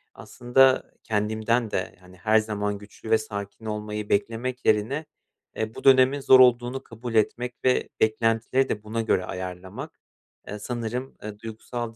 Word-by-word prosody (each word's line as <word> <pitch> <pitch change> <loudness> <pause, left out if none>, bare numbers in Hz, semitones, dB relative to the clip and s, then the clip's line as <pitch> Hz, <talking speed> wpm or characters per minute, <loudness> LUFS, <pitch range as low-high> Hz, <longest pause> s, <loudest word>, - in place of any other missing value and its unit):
aslında 130 +2 +2
kendimden 110 +1 0
de, 95 - -3
hani, 90 0 -17
her 110 +4 +3
zaman 105 -1 -2
güçlü 105 +2 -12
ve 110 - +6
sakin 105 0 -7
olmayı 105 -1 -4
beklemek 115 +5 -1
yerine, 115 +9 +1 0.5
eee, 110 0 -3
bu - - -9
dönemin 135 +1 +5
zor 130 -1 +6
olduğunu 125 +1 +4
kabul 115 +1 -8
etmek 120 +3 +1
ve 130 -1 +2
beklentileri 115 +4 +2
de 105 - -3
buna 110 +2 -2
göre 100 -4 +1
ayarlamak, 90 0 -7 0.5
eee, 105 - -6
sanırım, 120 +3 -4
eee, 105 -1 -7
duygusal 115 +1 -6
110 Hz, 145 wpm, -25 LUFS, 105-125 Hz, 0.5 s, ve